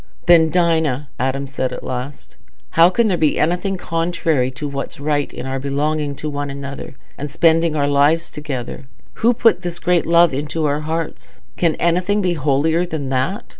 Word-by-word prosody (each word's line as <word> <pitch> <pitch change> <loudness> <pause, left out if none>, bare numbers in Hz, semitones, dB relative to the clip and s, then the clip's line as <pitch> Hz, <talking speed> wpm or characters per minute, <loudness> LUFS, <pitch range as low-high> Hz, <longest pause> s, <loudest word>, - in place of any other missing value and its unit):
"Then, 165 -2 +6
Dinah," 160 -6 +1
Adam 135 +2 -1
said 130 -2 -3
at - - -7
last, 130 +2 -6 0.4
"how 165 +2 +6
can 230 +5 +2
there 180 -5 0
be 155 -2 +2
anything 180 +4 0
contrary 165 -6 0
to 140 +3 -6
what's 140 -1 -5
right 145 0 -1
in 125 - -7
our 135 0 -3
belonging 145 +1 -1
to 155 - -5
one 145 -1 -3
another 140 -1 -7 0.2
and 145 +1 -4
spending 165 +1 +3
our 145 -2 +1
lives 145 +4 +2
together? 135 -4 -6 0.3
Who 235 +2 +4
put 225 -6 +3
this 175 -2 -5
great 175 -1 +1
love 170 -2 +5
into 150 +3 -2
our 145 0 0
hearts? 150 - -5
Can 165 +4 +1
anything 180 +5 +1
be 185 -3 +1
holier 155 +3 +1
than 155 -6 -4
that? 135 +10 -1
155 Hz, 175 wpm, -19 LUFS, 140-170 Hz, 0.4 s, Then